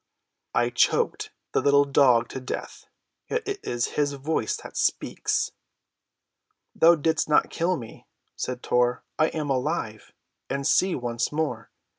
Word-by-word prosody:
"I 120 0 +2
choked 120 - +1 0.2
the - - +1
little 140 0 +4
dog 130 -4 +4
to - - -5
death, 130 - -6 0.4
yet 475 -1 -2
it 405 -1 -3
is 120 0 -2
his 145 -1 0
voice 140 -4 -1
that - - -11
speaks." - - 0 1.2
"Thou 170 +1 +6
didst 160 0 0
not 150 - +3
kill 175 +1 0
me," 115 -3 -11 0.3
said 125 -1 -4
Tor. 125 0 +1 0.2
"I 155 - +5
am 150 -4 -3
alive, 130 -5 -2 0.4
and 140 0 -2
see 185 +5 +3
once 120 -1 -2
more. 145 -8 -2
140 Hz, 140 wpm, -25 LUFS, 120-160 Hz, 1.2 s, Thou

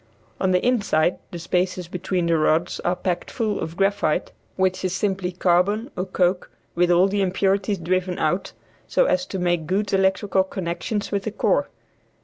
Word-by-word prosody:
On 190 - +1
the 180 -1 +2
inside 200 -9 +2
the 175 - -7
spaces 180 +1 -1
between 180 0 -2
the 170 0 +2
rods 160 +2 +1
are 175 - 0
packed 180 -1 -3
full 220 -4 -1
of 165 +2 -5
graphite, 195 -5 +1 0.2
which 185 0 0
is 185 0 -1
simply 190 -2 -1
carbon 185 +7 +1
or 180 - -2
coke 180 -1 0 0.2
with 175 +1 +2
all 175 +2 +5
the 200 +1 0
impurities 195 +2 +1
driven 180 +1 -1
out, 175 +5 0 0.4
so - - +3
as 275 - +1
to 195 - -4
make 175 -3 0
good 195 +3 -1
electrical 190 0 +2
connections 190 +3 -4
with 200 -1 0
the 215 - -2
core. - - +1
185 Hz, 170 wpm, -23 LUFS, 175-195 Hz, 0.4 s, all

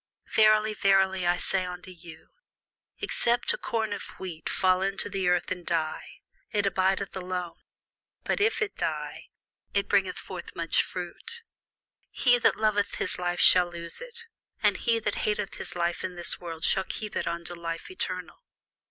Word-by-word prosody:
Verily, 215 0 +5
verily, 190 -2 +3
I 175 0 +3
say 190 0 0
unto 180 0 -7
you, 170 -2 -13 0.7
Except 240 +1 +2
a - - -3
corn 220 -2 -1
of - - -4 0.2
wheat 175 -4 -5
fall 185 0 +2
into 195 +1 -1
the 190 -1 -1
ground 180 0 +3
and 180 -1 -3
die, 165 - -3 0.3
it 205 -2 0
abideth 195 0 +1
alone: 180 -2 -4 0.6
but - - 0
if 440 +1 +3
it 420 - -4
die, - - -3 0.5
it 200 0 +2
bringeth 195 -2 +2
forth 180 -2 -8
much 165 -1 +2
fruit. 455 - -7 0.7
He 245 -1 +4
that - - +4
loveth 215 -2 +1
his 185 - -2
life 175 0 -1
shall 180 -1 +7
lose 170 -1 -5
it; 475 -1 -8 0.4
and - - +4
he 230 -2 +2
that 210 -2 -1
hateth 210 -2 -1
his - - -6
life 175 0 -1
in 185 -1 -4
this 175 -1 +3
world 165 -2 -7
shall 190 - +3
keep 215 +1 -6
it - - -1
unto 170 +1 -3
life 165 - -5
eternal. 375 - -4
190 Hz, 165 wpm, -28 LUFS, 175-215 Hz, 0.7 s, shall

